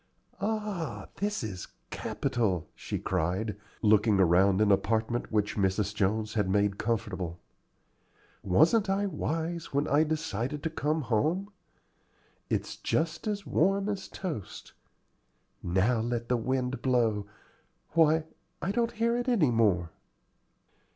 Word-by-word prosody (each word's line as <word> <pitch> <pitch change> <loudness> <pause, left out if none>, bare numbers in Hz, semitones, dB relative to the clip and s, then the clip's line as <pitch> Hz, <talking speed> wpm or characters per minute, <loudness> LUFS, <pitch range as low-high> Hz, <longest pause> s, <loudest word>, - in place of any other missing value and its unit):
"Ah, 210 -5 -3
this 205 - -1
is 95 -5 -5 0.2
capital," 115 - -1
she - - -4
cried, 95 +6 -1 0.3
looking 105 -1 +4
around 95 +2 +4
an 105 -1 +4
apartment 110 +4 +1
which 105 -1 0
Mrs. 100 +1 +1
Jones 105 +1 0
had 105 -4 +1
made 100 0 +1
comfortable. 100 -7 -2 1.0
"Wasn't 165 - +4
I 195 +1 +1
wise 165 -4 -3
when 145 +1 +2
I 145 +2 +4
decided 150 -3 -2
to 160 - -1
come 155 0 0
home? 155 - 0 1.0
It's - - -2
just 160 +5 -1
as 205 -2 -2
warm 195 +4 +2
as 200 -2 -3
toast. 160 - -6 0.9
Now 95 +7 +2
let 120 +1 -2
the 125 - +3
wind 125 +1 -1
blow 115 -6 +1 0.6
Why, 160 0 +4 0.4
I 190 - -1
don't 235 +2 0
hear 235 +1 +1
it 245 +1 -2
any 180 - +3
more." 95 -8 +2
120 Hz, 125 wpm, -29 LUFS, 105-165 Hz, 1.0 s, looking